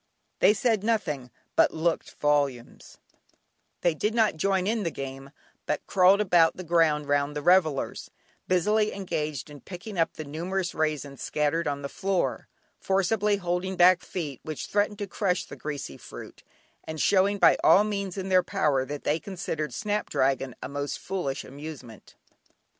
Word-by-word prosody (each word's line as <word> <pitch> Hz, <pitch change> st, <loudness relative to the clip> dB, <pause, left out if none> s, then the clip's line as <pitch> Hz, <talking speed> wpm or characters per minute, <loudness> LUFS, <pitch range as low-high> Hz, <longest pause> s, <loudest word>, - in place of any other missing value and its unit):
They 210 Hz, -, +5 dB
said 220 Hz, -2 st, +1 dB
nothing, 160 Hz, -, -1 dB, 0.3 s
but -, -, +4 dB
looked 160 Hz, +1 st, -1 dB
volumes; 140 Hz, -5 st, -1 dB, 0.8 s
they 175 Hz, -, +3 dB
did 210 Hz, +8 st, -1 dB
not 220 Hz, -5 st, +3 dB
join 190 Hz, +3 st, +1 dB
in 220 Hz, +2 st, 0 dB
the 170 Hz, -, -1 dB
game, 135 Hz, -2 st, -7 dB, 0.4 s
but 150 Hz, -, -2 dB
crawled 190 Hz, +1 st, +5 dB
about 175 Hz, -5 st, +4 dB
the 185 Hz, -, -6 dB
ground 160 Hz, -3 st, +2 dB
round 145 Hz, +1 st, +1 dB
the 150 Hz, -, -2 dB
revellers, 165 Hz, -5 st, +2 dB, 0.4 s
busily 210 Hz, +4 st, +2 dB
engaged 155 Hz, -8 st, -3 dB
in 145 Hz, -1 st, -12 dB
picking 190 Hz, +1 st, -7 dB
up 165 Hz, -, +2 dB
the 155 Hz, -, -6 dB
numerous 175 Hz, +5 st, -3 dB
raisins 150 Hz, -3 st, -2 dB
scattered 150 Hz, +2 st, 0 dB
on 140 Hz, -1 st, -2 dB
the -, -, -2 dB
floor, 190 Hz, +5 st, -1 dB, 0.3 s
forcibly 200 Hz, +2 st, +1 dB
holding 180 Hz, 0 st, -2 dB
back 180 Hz, 0 st, +6 dB
feet 150 Hz, -8 st, -5 dB
which 155 Hz, -2 st, -5 dB
threatened 205 Hz, 0 st, 0 dB
to 205 Hz, -, -3 dB
crush 185 Hz, -2 st, -1 dB
the -, -, -10 dB
greasy 145 Hz, -, -6 dB
fruit, -, -, -11 dB, 0.4 s
and 160 Hz, 0 st, -6 dB
showing 200 Hz, +3 st, +3 dB
by -, -, +6 dB
all 200 Hz, -, +7 dB
means 200 Hz, -3 st, -3 dB
in 190 Hz, 0 st, -4 dB
their 185 Hz, -1 st, +5 dB
power 150 Hz, -9 st, +1 dB
that 145 Hz, +1 st, -6 dB
they 155 Hz, -, +1 dB
considered 165 Hz, -7 st, -4 dB
"Snap 210 Hz, -, -2 dB
dragon" 135 Hz, -1 st, 0 dB
a -, -, -3 dB
most 145 Hz, +1 st, -4 dB
foolish 155 Hz, -7 st, -3 dB
amusement. 140 Hz, -5 st, -10 dB
170 Hz, 160 wpm, -27 LUFS, 145-195 Hz, 0.8 s, all